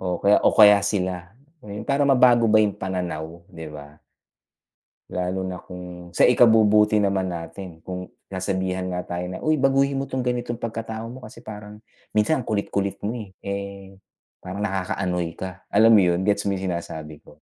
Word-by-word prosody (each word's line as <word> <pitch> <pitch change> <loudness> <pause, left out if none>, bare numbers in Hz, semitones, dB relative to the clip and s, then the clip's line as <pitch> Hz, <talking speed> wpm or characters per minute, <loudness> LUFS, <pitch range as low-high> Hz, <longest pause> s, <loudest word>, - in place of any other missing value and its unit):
o 90 -2 -2
kaya 100 +1 +4
o - - +5
kaya 105 -2 +7
sila. 90 -3 -2 0.3
Yun, 105 0 -8
para 140 +1 +2
mabago 125 -3 +5
ba 110 - +6
yung 100 -2 0
pananaw, 85 -3 -4
'di 80 -1 -9
ba? 75 0 -11 1.1
Lalo 90 +1 -2
na 90 -1 -6
kung 90 -1 -10
sa - - +6
ikabubuti 110 -3 +5
naman 95 -2 +1
natin. 85 +1 -7
Kung 90 0 -6 0.2
sasabihan 95 -1 -2
nga 90 0 -4
tayo 90 +1 -4
na, 90 - -5
"Uy 155 - +1
baguhin 135 0 +2
mo 135 - -6
'tong 130 -1 -2
ganitong 120 -1 -2
pagkatao 110 -1 -5
mo, 130 - -10
kasi 115 +1 -13
parang 105 -1 -9 0.3
minsan 110 +7 +1
ang - - -12
kulit-kulit 100 -1 -1
mo, 110 - -1 0.3
eh. 100 -1 -6 0.4
Parang 95 +3 -4
nakaka-annoy 90 -3 -2
ka." 95 0 -7
Alam 110 +3 +5
mo 105 - +7
yun? 90 0 +1
Gets 100 -1 +1
mo 100 - -1
yung 95 - -5
sinasabi 80 -3 -7
ko? - - -18
100 Hz, 170 wpm, -23 LUFS, 90-110 Hz, 1.1 s, kaya